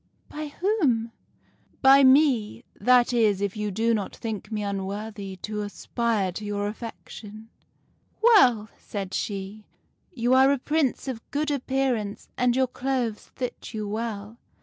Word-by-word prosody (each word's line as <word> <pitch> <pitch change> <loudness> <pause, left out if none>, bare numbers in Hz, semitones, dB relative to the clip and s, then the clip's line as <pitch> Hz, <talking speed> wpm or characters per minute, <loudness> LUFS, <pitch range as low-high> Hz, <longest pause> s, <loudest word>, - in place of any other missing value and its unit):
" - - -41
' - - -38
By 305 0 -5
whom? 290 - 0 0.2
' - - -38
" - - -38
' - - -36
By 270 +1 +8
me. 260 -5 +4 0.2
That 250 0 +4
is, 215 -5 +3
if 200 0 -2
you 210 -1 -2
do 225 +4 +1
not 205 -3 -2
think 215 -2 -6
me 210 -1 -2
unworthy 200 0 -4
to 210 0 -3
aspire 210 -1 -1
to 210 - -7
your 205 0 -2
affection.' 215 0 -8 0.2
" - - -41
' - - -42
Well,' 250 - +5
said 195 -2 -6
she, 200 +1 -4 0.4
'you 245 -5 +1
are 265 +1 +6
a 280 - +2
Prince 290 0 0
of 245 -4 -4
good 295 +1 -1
appearance, 260 -6 -1
and 250 -1 +2
your 260 0 +3
clothes 250 -3 -3
fit 250 -2 -5
you 215 - -3
very 205 0 -4
well. 220 -1 -4
225 Hz, 170 wpm, -26 LUFS, 210-260 Hz, 0.4 s, By